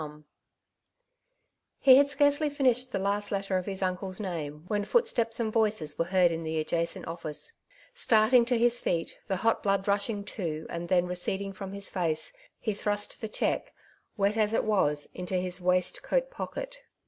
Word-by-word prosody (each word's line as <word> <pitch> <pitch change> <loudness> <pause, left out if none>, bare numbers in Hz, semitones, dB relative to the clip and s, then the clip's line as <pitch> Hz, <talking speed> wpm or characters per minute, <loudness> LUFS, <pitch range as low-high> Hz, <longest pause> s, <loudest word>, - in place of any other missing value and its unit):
A - - -3
Momenfs - - -5
Delirium, 150 0 -16 1.6
201 265 - +9
He - - +9
had 285 0 +3
scarcely 285 +1 +3
finished 255 -3 +1
the - - -1
last 200 +1 -1
letter 195 -1 0
of 185 - -8
his 195 -1 -2
uncle's 185 +1 -2
name, 155 -6 -5
when 205 0 0
footsteps 235 - +1
and 220 -2 -1
voices 215 -9 +1
were 165 - +2
heard 180 -1 +3
in 165 0 -3
the 160 0 -2
adjacent 170 +2 -1
oflBic^. 165 - -5 0.4
Starting 235 - +4
to 245 0 +1
his 240 +1 +3
feet, 165 -2 -2
the 190 - 0
hot 225 +5 +1
blood 195 -1 0
rushing 200 +1 0
to 160 -6 -4
and 170 0 -5
then 180 -1 +3
receding 190 +2 -2
from 195 0 -7
his 200 0 -3
face, 160 -4 -1 0.3
he 215 - -1
thrust 205 +2 -3
the 220 - -4
cheque, - - -1 0.4
wet 200 +2 +1
as 215 0 +2
it - - +2
was, 150 -9 +1
into 180 +1 -4
his 180 0 -1
waist 180 0 +1
coat - - 0
pocket. - - -6
200 Hz, 185 wpm, -29 LUFS, 180-225 Hz, 1.6 s, 201